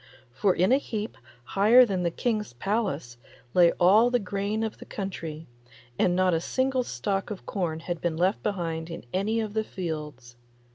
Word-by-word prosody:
For 195 - +2
in 185 +5 +3
a 265 - +5
heap 215 -5 -5 0.3
higher 220 - +6
than 195 -5 -1
the 175 - +1
King's 215 - -2
palace 160 - -2 0.4
lay 175 -2 +6
all 205 +7 +5
the 245 - +3
grain 205 +1 -2
of 220 - -4
the - - -10
country, 165 -6 -6 0.5
and 175 - +3
not 185 -1 +3
a 165 - +1
single 260 +5 0
stalk 195 -5 -2
of 205 -3 -7
corn 165 -5 -2
had 175 -1 -4
been 170 -2 -1
left 185 +5 +1
behind 165 -5 -3
in 165 -4 -7
any 210 +4 0
of 215 -2 -4
the 220 0 0
fields. 150 - -6
190 Hz, 180 wpm, -27 LUFS, 165-215 Hz, 0.5 s, higher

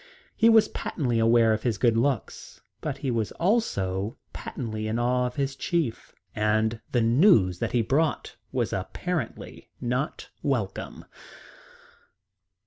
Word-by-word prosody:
He 230 - +5
was 225 -1 +6
patently 120 -8 -2
aware 115 0 +4
of 110 - -2
his 115 -3 0
good 115 +1 +3
looks. 125 0 -2 0.2
But - - -3
he 135 - -2
was 115 -3 -1
also 105 - 0 0.2
patently 110 -2 -5
in 110 +1 -1
awe 125 +1 +1
of 125 - -8
his 135 -1 -1
chief, 160 -7 -2 0.2
and 110 +1 +1
the 120 - +2
news 115 - +4
that - - -2
he 120 -2 +3
brought 150 +7 0 0.2
was - - -1
apparently 125 - -4
not 125 +4 -3
welcome. 115 -9 -3
120 Hz, 135 wpm, -26 LUFS, 110-140 Hz, 0.2 s, was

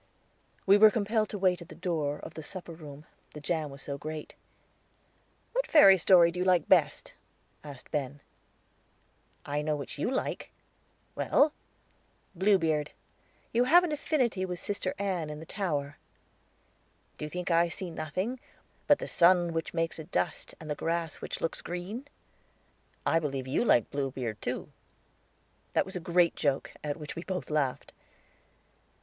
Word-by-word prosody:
We 200 +1 +6
were 215 0 +9
compelled 215 0 0
to 210 - -4
wait 185 -2 +2
at 170 - -11
the - - -10
door 150 -5 -1
of - - -10
the 160 - -7
supper 175 +3 -4
room, 150 -2 -11 0.3
the - - -6
jam 155 0 -2
was 140 0 -10
so 140 -1 -5
great. 155 +1 -6 1.2
"What - - 0
fairy 195 -12 +8
story 175 -2 +6
do 180 - -6
you - - +2
like 180 -3 +3
best?" - - +2 0.5
asked 145 -4 -11
Ben 145 -2 -2 1.3
"I 145 +1 -1
know 150 0 0
which 145 0 -7
you - - 0
like." 260 - -2 0.6
"Well?" 295 +1 +3 0.8
"Bluebeard. 165 -6 +2 0.6
You 240 +2 +3
have 345 +7 +7
an 345 - -1
affinity 265 -9 0
with 180 -2 -4
Sister 195 -2 -3
Ann 185 -6 -2
in 150 0 -6
the 160 - -9
tower." 150 -8 -3 1.2
"Do - - -3
you - - -6
think 180 +2 -4
I 170 +1 +4
see 180 +1 -6
nothing 185 - -3 0.5
'but 290 - +6
the - - -5
sun 175 -1 +4
which 165 0 -2
makes 165 -1 -2
a - - -5
dust 180 - -2
and 160 - -10
the 150 - -1
grass 165 +2 -2
which - - -5
looks 165 - -2
green?' 190 +10 -6 1.0
I 165 - +3
believe 135 -4 -3
you 130 - +1
like 120 - +3
Bluebeard, 130 -6 -3
too." - - -4 1.0
That - - +2
was 190 - -7
a - - -2
great 170 0 +2
joke, 140 -3 0
at 150 0 -3
which 150 -2 -7
we 170 - -5
both 185 -4 -4
laughed. 145 -4 -1
170 Hz, 160 wpm, -29 LUFS, 150-190 Hz, 1.3 s, were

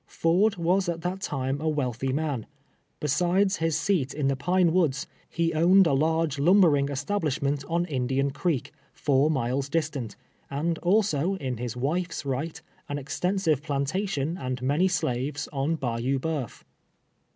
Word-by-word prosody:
Ford 190 +6 +2
was 180 +1 +1
at 165 -1 -3
that 185 +2 -3
time 135 -3 -2
a 160 - +1
wealthy 130 -3 -1
man. 140 -5 -2 0.5
Besides 180 +7 +2
his 165 -1 0
seat 165 -6 0
in 145 -2 0
the 135 - +1
Pine 175 +5 +2
"N^oods, 160 -6 +1 0.2
he 165 0 0
owned 180 +4 +5
a 165 - +2
large 160 +1 +1
lumbering 155 -4 +4
establishment 145 -2 -1
on 170 +1 +1
Indian 135 -2 0
Creek, 145 -1 -1 0.2
foin 145 +1 +2
miles 135 0 -1
distant, 145 -8 -2 0.3
and 160 +4 -1
also, 190 -2 +2
in 130 -9 -4
his 120 0 -4
wife's 165 +5 -2
right, 140 +5 -3 0.3
an 145 - -2
extensive 160 +2 0
plantation 155 +3 -2
and 130 -1 -3
many 145 +8 +2
slaves 145 -4 -1
on 140 +4 0
Bayou 125 -1 -1
Uteuf. 140 -4 -4
150 Hz, 145 wpm, -26 LUFS, 135-175 Hz, 0.5 s, owned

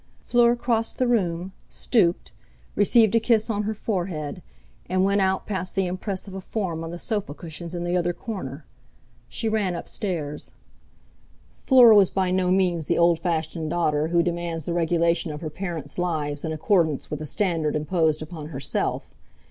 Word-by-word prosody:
Fleur 240 0 +3
crossed 230 -2 0
the 255 - +2
room, 190 -6 0 0.2
stooped, 180 -8 +1 0.4
received 220 +1 +4
a 230 - +5
kiss 225 0 +2
on 205 -1 -1
her 215 +1 -2
forehead, 175 -8 -3 0.5
and 185 +1 +2
went 200 +1 +2
out 190 0 +1
past 185 -3 -3
the 195 -1 +2
impress 185 +2 -4
of 195 - -9
a 190 - -6
form 180 -5 -3
on 165 - -5
the 175 - -6
sofa 200 - -2
cushions 170 +1 -8
in 175 - -3
the 175 +1 -1
other 175 -1 +1
corner. 170 - -6 0.6
She 230 - -3
ran 210 -5 0
up 170 - -6
stairs. 155 -7 -4 1.0
Fleur 250 -4 +6
was 200 -3 +6
by 190 -2 0
no 185 -1 +1
means 180 -4 +1
the 170 - +1
old 170 -1 +4
fashioned 160 -2 -2
daughter 155 -2 +1
who 170 +1 +2
demands 170 -2 -3
the 170 - -2
regulation 170 0 +1
of 150 - -7
her 155 -2 -5
parents' 165 -3 -5
lives 150 -5 -2
in 160 - -2
accordance 160 -2 +1
with 150 - -3
the 155 - -5
standard 165 -5 0
imposed 155 0 +1
upon 155 -2 -8
herself. 140 -2 -2
175 Hz, 175 wpm, -24 LUFS, 160-195 Hz, 1.0 s, Fleur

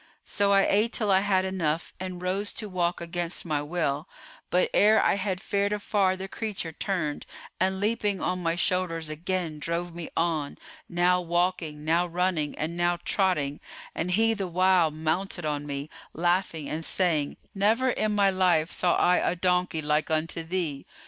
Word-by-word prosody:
So 200 0 +1
I 195 0 +5
ate 215 +3 +2
till 210 -3 +1
I 190 - +6
had 190 -1 +1
enough 170 -4 -2
and 180 -1 -6
rose 195 +3 0
to 215 - -3
walk 180 -2 -1
against 170 0 -2
my 150 -3 0
will; 150 -2 -2 0.4
but, 180 - +3
ere 215 +2 +5
I - - +3
had 190 -2 -2
fared 200 +1 -1
afar 200 -2 +1
the 190 +1 -5
creature 200 -5 -4
turned 160 -4 -2 0.4
and 190 +1 +1
leaping 205 -2 0
on 180 0 -1
my 165 -1 0
shoulders 170 -3 0
again 170 -1 -3
drove 170 +2 -3
me 170 -1 -6
on, 160 -4 0 0.3
now 180 +1 +3
walking, 175 -3 -1
now 170 +3 +2
running 175 -3 -1
and 160 +2 -2
now 175 0 +1
trotting, 150 -8 +1 0.3
and 165 - -2
he 225 +5 +3
the 200 -4 -3
while 180 -1 +3
mounted 160 +3 -2
on 145 -1 -2
me, 140 0 -4 0.3
laughing 175 -3 0
and 160 +2 -4
saying, 160 -5 +1 0.2
'Never 225 +6 +2
in 215 -2 -1
my 200 -1 +4
life 180 -4 +2
saw 175 -1 +2
I 180 0 +4
a - - +1
donkey 180 -2 0
like 150 +1 +1
unto 160 +1 -1
thee! 165 -4 -3
180 Hz, 170 wpm, -27 LUFS, 160-190 Hz, 0.4 s, I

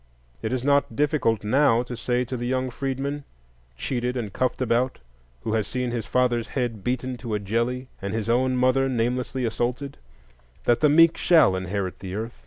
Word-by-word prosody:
It 110 - -2
is 130 -1 -1
not 140 -3 +2
difficult 140 -7 +1
now 120 +1 +3
to 125 0 -6
say 125 +2 0
to 130 - -5
the 120 0 -3
young 130 0 -1
freedman, 140 +3 -3 0.5
cheated 125 - -2
and 105 -5 -4
cuffed 130 -1 0
about 125 +1 +1 0.4
who 110 - -2
has 110 -2 0
seen 125 -1 -2
his 115 -4 -3
father's 120 -2 +1
head 120 -6 -3
beaten 125 +2 -2
to 120 -3 -4
a - - -1
jelly 115 +5 -1
and 100 0 -3
his 110 0 -2
own 130 +2 +2
mother 130 +1 +3
namelessly 125 +1 -1
assaulted, 125 +4 -2 0.7
that 120 -1 +3
the 150 - +4
meek 165 +2 +6
shall 160 - +5
inherit 95 0 -3
the 95 0 -6
earth. 115 +3 -5
125 Hz, 185 wpm, -25 LUFS, 115-130 Hz, 0.7 s, meek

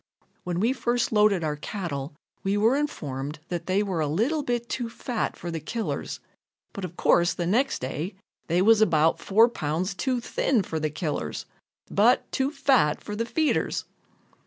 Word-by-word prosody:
When 175 -1 -2
we 230 +6 +2
first 240 -2 0
loaded 210 -5 +4
our 150 -1 -1
cattle 150 -4 -5 0.3
we 195 +1 +1
were 225 +5 +4
informed 150 - -3
that 175 -2 -4
they 190 +2 +2
were 190 -5 -2
a 155 - +1
little 230 - +1
bit 240 -3 -2
too 240 -1 -3
fat 235 0 -3
for 175 - -5
the 165 - -3
killers, 230 +8 -4 0.5
but, 200 - -6
of 175 -1 -6
course, 175 0 +3
the 175 - -2
next 230 +10 +1
day, 155 +9 -3 0.3
they 175 +2 +2
was 220 +1 +6
about 160 -6 +4
four 220 +4 +5
pounds 180 -3 -2
too 255 +5 -1
thin 235 -1 +1
for 160 -2 -3
the 155 0 0
killers, 150 - -3 0.4
but 230 +5 +3
too 265 +1 +1
fat 260 - +2
for 210 - -5
the 230 +2 -2
feeders. 315 +5 0
195 Hz, 175 wpm, -26 LUFS, 160-235 Hz, 0.5 s, was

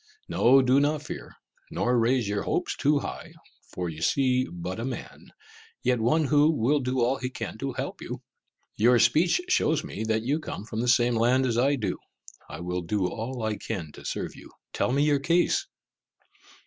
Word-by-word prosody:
No, 135 +2 +5
do 130 +2 +4
not 145 +1 0
fear - - -8 0.3
nor 125 +1 0
raise 120 -1 +2
your 100 0 -1
hopes - - -1
too 145 0 +2
high; - - -7 0.4
for 90 -1 -3
you 80 -1 -7
see 130 +5 +2
but 90 +3 -5
a - - -3
man, 130 -1 -7 0.5
yet 125 -1 +2
one 125 +8 +2
who 150 +1 +4
will 145 -1 +2
do 130 -1 -1
all 125 +3 +2
he 125 -1 -4
can - - -6
to - - -3
help - - -5
you. - - -7 0.5
Your 120 +3 +4
speech 170 - +3
shows 160 - +2
me 110 - -5
that 110 0 0
you 140 +6 0
come 110 - -7
from 110 0 -4
the 125 - -1
same 120 0 +4
land 125 +3 +3
as 120 -3 0
I 140 +3 +3
do. 105 -8 -3 0.5
I - - -7
will 90 +1 -3
do 95 +3 -1
all 115 +5 -4
I 110 -1 -1
can 90 -9 -5
to - - -13
serve - - -4
you. - - -13 0.2
Tell - - 0
me 140 +2 +2
your 145 -1 +3
case." 175 - +1
125 Hz, 195 wpm, -27 LUFS, 110-140 Hz, 0.5 s, No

